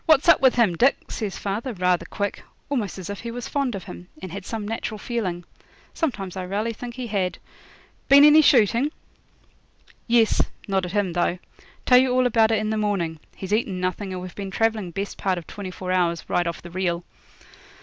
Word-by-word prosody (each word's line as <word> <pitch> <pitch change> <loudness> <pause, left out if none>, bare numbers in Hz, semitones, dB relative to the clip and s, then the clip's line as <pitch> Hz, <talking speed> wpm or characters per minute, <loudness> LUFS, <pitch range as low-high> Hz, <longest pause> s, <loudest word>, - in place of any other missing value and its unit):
'What's 315 -2 +5
up - - +7
with 260 -2 +5
him, 225 -8 +3
Dick?' 260 +10 +2
says 210 -4 -3
father, 215 +6 -3
rather 180 -3 +1
quick, 205 -1 -3 0.3
almost 230 -11 -2
as 185 -2 -7
if 200 -1 -5
he 235 - -6
was 240 +1 -5
fond 275 -5 -1
of 190 - -6
him, 90 +1 -10
and 185 0 -7
had 195 +1 -7
some 220 -3 -4
natural 220 -1 -3
feeling 195 -6 -3 0.5
sometimes 205 - -3
I 190 - -3
raly 210 +5 -2
think 240 +2 -8
he 255 -1 -5
had 195 -5 -1 0.7
'been 280 +1 +9
any 300 +1 +8
shooting?' 240 -1 +4 1.2
'Yes; 230 -2 +4 0.3
not 190 -2 0
at 175 - -8
him, 200 -4 0
though. 175 0 +1 0.5
Tell 250 -1 +7
you 260 0 +2
all 255 0 +3
about 225 -2 +4
it 225 - +2
in 215 +1 -1
the 220 - 0
morning. 190 -7 -1 0.2
He's 190 +1 -4
eaten 210 -4 0
nothing, 185 +2 -2
and 180 -1 -5
we've 185 - -8
been 200 -1 -6
travelling 220 -1 0
best 195 +4 -5
part 190 -2 0
of 170 - -6
twenty 200 -2 -7
four 185 0 -5
hours 170 -2 0
right 175 -1 +1
off 170 - -5
the 175 - -10
reel.' 175 -1 -1
205 Hz, 205 wpm, -24 LUFS, 185-235 Hz, 1.2 s, been